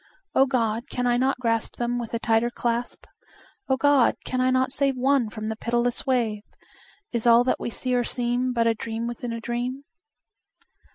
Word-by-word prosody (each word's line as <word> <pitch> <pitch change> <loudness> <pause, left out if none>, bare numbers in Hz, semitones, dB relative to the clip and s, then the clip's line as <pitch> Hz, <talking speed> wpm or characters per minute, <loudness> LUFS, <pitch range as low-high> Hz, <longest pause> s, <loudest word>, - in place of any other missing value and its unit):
O 270 - +4
God! 235 -1 -1
can 250 - -2
I 240 -1 +3
not 260 +1 +1
grasp 230 -2 -1
Them 240 0 -1
with 235 -2 -5
a - - +1
tighter 230 0 +2
clasp? 240 0 -3 0.6
O 265 - +3
God! 285 -3 +4
can 255 0 -1
I 255 - +3
not 260 0 +2
save 275 -1 +1
One 260 -2 +2
from 215 0 -7
the 220 0 -2
pitiless 240 +2 -1
wave? 230 -5 +1 0.7
Is 235 -1 -1
all 235 +1 +7
that 255 - 0
we - - -3
see 250 +2 -3
or 245 -1 +2
seem 245 +1 -1
But 235 -2 +1
a 230 - +4
dream 225 +1 -4
within 240 0 -4
a 230 - -4
dream? 245 +4 -3
240 Hz, 190 wpm, -25 LUFS, 230-255 Hz, 0.7 s, all